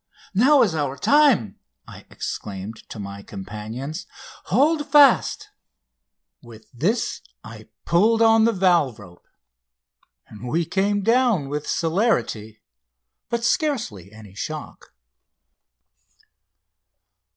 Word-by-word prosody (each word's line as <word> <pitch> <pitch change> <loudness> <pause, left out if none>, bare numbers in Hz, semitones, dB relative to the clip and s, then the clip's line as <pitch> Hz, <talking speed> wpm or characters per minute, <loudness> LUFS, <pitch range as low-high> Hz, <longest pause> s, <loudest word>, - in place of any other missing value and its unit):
"Now 260 +7 +5
is 200 -8 0
our 145 -3 -2
time!" 280 - +3 0.3
I - - -13
exclaimed 100 +2 -7
to - - -9
my 100 -1 -7
companions. 110 +9 -7 0.4
"Hold 295 - +1
fast!" 295 +8 +4 0.9
With 115 -3 -14
this 195 - -1 0.2
I - - -12 0.2
pulled 215 +7 +3
on 225 -1 +5
the 230 - +3
valve 175 - +2
rope, 90 -4 -16 1.0
and 110 +3 -10
we 165 +5 0
came 200 +3 0
down 230 - +2
with 150 +1 -4
celerity 160 - -1 0.7
but 235 0 -2
scarcely 225 - -1
any 105 -3 -14
shock. 155 +9 -8
165 Hz, 100 wpm, -22 LUFS, -, 1.0 s, Now